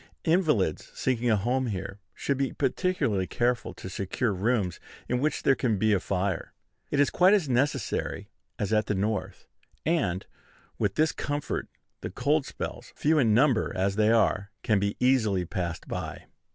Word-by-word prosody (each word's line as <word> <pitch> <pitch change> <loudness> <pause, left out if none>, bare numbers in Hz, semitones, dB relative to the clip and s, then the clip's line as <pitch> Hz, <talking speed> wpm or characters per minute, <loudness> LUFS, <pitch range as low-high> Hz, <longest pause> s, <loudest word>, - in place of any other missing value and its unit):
Invalids 155 - +1
seeking 125 -2 0
a 110 - +5
home 125 +5 0
here 100 -1 -5 0.2
should 140 - -1
be 135 -1 0
particularly 135 - 0
careful 120 0 0
to - - -8
secure 100 +5 -1
rooms 100 -2 0 0.3
in 125 - 0
which 155 +4 0
there 135 - +5
can 120 -5 0
be 110 +2 +3
a 100 - +3
fire. 95 -1 -2 0.4
It 145 - 0
is 145 - +4
quite 185 +3 +5
as 185 -8 0
necessary 130 +3 -1 0.3
as 105 +1 -1
at 110 0 +2
the 105 - 0
North; 105 +1 -2 0.4
and, 100 - 0 0.5
with - - 0
this 155 0 +3
comfort, 145 0 -3 0.3
the - - -5
cold 145 +2 +1
spells, - - -6
few 155 +1 +2
in 110 -6 +4
number 130 -2 +3
as 95 +1 +1
they 110 0 +3
are, 100 -3 +2
can 105 -3 +3
be 100 +1 -1
easily 110 -8 +2
passed 85 -1 -4
by. - - -5
115 Hz, 165 wpm, -27 LUFS, 100-140 Hz, 0.5 s, a